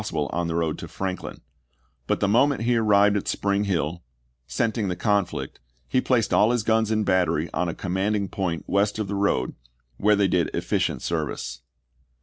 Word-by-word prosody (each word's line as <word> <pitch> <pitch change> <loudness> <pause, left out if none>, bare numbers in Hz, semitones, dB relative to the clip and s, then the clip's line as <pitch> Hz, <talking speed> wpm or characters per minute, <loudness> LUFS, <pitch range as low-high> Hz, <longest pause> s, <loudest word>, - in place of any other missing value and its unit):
sible 80 -9 -3
on 85 -1 -1
the 80 - -2
road 80 -2 -1
to - - -7
Franklin; 95 -1 -5 0.7
but - - +1
the - - +3
moment 125 +4 +3
he 120 +1 +2
arrived 105 -2 +4
at 100 - -2
Spring 100 0 0
Hill, 85 -3 -1 0.5
scenting 110 - -1
the 90 - -2
conflict, 100 0 -1 0.3
he 130 - +1
placed 125 -4 +1
all 105 - +5
his 120 -3 +1
guns 110 0 +2
in 110 -1 +1
battery 85 -4 +1
on 90 -1 0
a - - -4
commanding 100 +2 -1
point 90 -4 -3
west 100 +1 +1
of 110 -2 -2
the 100 - -4
road, 100 -10 0 0.4
where 105 +1 +4
they 100 -1 +3
did 90 -3 +1
efficient - - -1
service. 65 -1 -3
100 Hz, 180 wpm, -24 LUFS, 85-105 Hz, 0.7 s, all